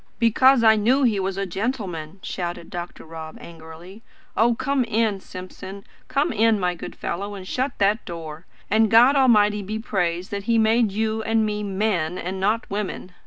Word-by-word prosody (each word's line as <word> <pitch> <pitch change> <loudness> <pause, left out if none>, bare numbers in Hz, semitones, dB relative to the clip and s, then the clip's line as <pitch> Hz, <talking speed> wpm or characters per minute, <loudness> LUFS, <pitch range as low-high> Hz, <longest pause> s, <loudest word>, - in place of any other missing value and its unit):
"Because 240 +2 +4
I 220 -1 +6
knew 250 +7 +3
he 220 -5 +2
was 190 0 -2
a 195 - -1
gentleman," 190 -5 -4
shouted 175 -2 -5
Dr. 175 -1 -7
Rob 160 -1 -9
angrily. 170 +5 -12 0.3
"Oh, 235 +2 +3
come 275 +2 0
in, 220 -3 0
Simpson 190 +1 -9 0.2
come 285 +1 0
in, 220 0 +3
my 180 -1 0
good 175 - -8
fellow 200 +3 -4
and 185 -1 -9
shut 260 +6 -1
that 205 +3 +2
door! 165 -1 -8 0.2
And 220 +1 +3
God 245 +6 +6
Almighty 210 -6 +4
be 210 +3 -4
praised 180 -5 -2
that 200 -1 -4
He 230 0 +2
made 220 0 +3
you 220 +2 -1
and 220 0 +1
me 210 0 -2
MEN, 190 -4 -1
and 185 +2 -4
not 215 +5 0
women!" 200 -2 -4
205 Hz, 175 wpm, -23 LUFS, 185-225 Hz, 0.3 s, I